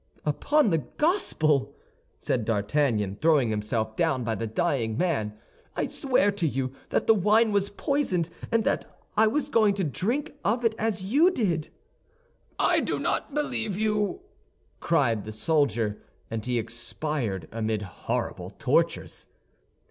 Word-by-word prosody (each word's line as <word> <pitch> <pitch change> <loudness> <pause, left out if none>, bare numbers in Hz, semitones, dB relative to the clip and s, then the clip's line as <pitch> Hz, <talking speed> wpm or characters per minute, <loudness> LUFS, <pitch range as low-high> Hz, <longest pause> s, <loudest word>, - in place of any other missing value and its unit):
"Upon 280 - +2
the 165 - +3
Gospel," 155 - +1 0.4
said 120 - -1
D'Artagnan, 105 -1 0
throwing 150 -6 +3
himself 110 +1 -2
down 145 -5 +1
by 115 -1 -1
the 115 0 -3
dying 115 -2 0
man, 110 -13 0 0.4
"I - - -1
swear 250 -7 +2
to 195 -5 -1
you 135 -2 -2 0.2
that - - +1
the 225 - +6
wine 215 +3 +3
was 200 -1 +1
poisoned 200 - 0 0.2
and 230 -1 +3
that - - -2 0.2
I 220 +1 +5
was 280 +5 0
going 215 -6 +4
to 195 - -1
drink 215 - -1
of 235 +4 +1
it 225 - +3
as 215 -3 -1
you 285 - +4
did." 185 - -1 0.9
"I - - +3
do - - -1
not 290 - -2
believe 220 -9 -1
you," 210 - 0 0.6
cried 120 -10 +1
the 110 - -7
soldier, 115 -4 0 0.3
and 110 -1 -3
he 125 +1 -1
expired 115 - -3
amid 110 -1 -1
horrible 90 - -4
tortures. - - 0
155 Hz, 140 wpm, -27 LUFS, -, 0.9 s, the